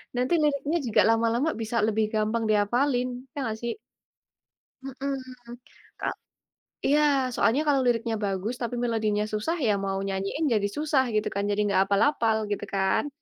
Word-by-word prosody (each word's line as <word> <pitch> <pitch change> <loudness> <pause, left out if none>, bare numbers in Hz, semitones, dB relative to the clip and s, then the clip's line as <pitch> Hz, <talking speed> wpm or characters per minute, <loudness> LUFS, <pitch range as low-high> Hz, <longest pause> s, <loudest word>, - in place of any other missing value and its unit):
nanti 250 +6 0
liriknya 295 +3 +1
juga 220 - +4
lama-lama 230 +6 +2
bisa 225 +1 -2
lebih 220 0 +1
gampang 215 +2 0
dihafalin, 245 +5 +2 0.3
ya 295 - -15
nggak 220 -3 -3
sih? 235 - -2 1.1
Mhm. 255 -3 -6 0.4
Ka - - -2 0.7
iya, 295 +2 +4 0.3
soalnya 255 +7 +2
kalau 280 -2 +3
liriknya 230 -1 +1
bagus 195 +4 -2
tapi 240 +1 -2
melodinya 215 -3 0
susah, 240 +12 -1
ya 215 - +4
mau 195 0 -1
nyanyiin 195 +11 -2
jadi 205 -2 +2
susah 295 -3 +2
gitu 215 0 +1
kan, 200 +1 -1
jadi 205 +1 0
nggak 200 -2 +2
hafal-hafal, 220 +2 +2 0.2
gitu 205 - -3
kan? 190 +9 +1
230 Hz, 150 wpm, -26 LUFS, 210-270 Hz, 1.1 s, juga